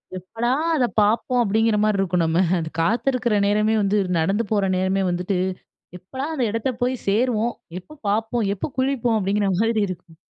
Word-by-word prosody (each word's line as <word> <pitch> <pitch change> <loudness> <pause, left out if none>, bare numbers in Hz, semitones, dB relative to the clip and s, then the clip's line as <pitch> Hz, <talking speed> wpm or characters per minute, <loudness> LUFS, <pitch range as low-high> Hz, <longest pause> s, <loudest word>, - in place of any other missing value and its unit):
எப்படா 225 +7 -3 0.2
அத 260 -5 +2
பார்ப்போம் 225 +4 +2
அப்பிடிங்கற 220 0 +2
மாரி 215 -1 +2
இருக்கும். 180 -2 +1
நம்ம 165 +2 +2 0.2
அந்த 160 -1 -4
காத்திருக்கிற 235 +2 +1
நேரமே 210 +2 +2
வந்து 200 +1 +1 0.2
நடந்து 195 +8 +1
போற 205 -2 +2
நேரமே 190 +1 0
வந்துட்டு, 180 +2 -1 0.6
எப்படா! 260 +10 -6
அந்த 265 -5 0
இடத்த 230 +4 -1
போயி 255 +1 +1
சேருவோம், 230 +2 +1 0.3
எப்போ 305 - -15
பார்ப்போம், 225 +2 0
எப்போ 195 - -4
குளிப்போம், 260 -3 +1
அப்பிடிங்கிற 200 +1 0
மாதிரி 225 +1 +1
இருக்கும். 175 -2 -9
215 Hz, 155 wpm, -22 LUFS, 195-235 Hz, 0.6 s, அத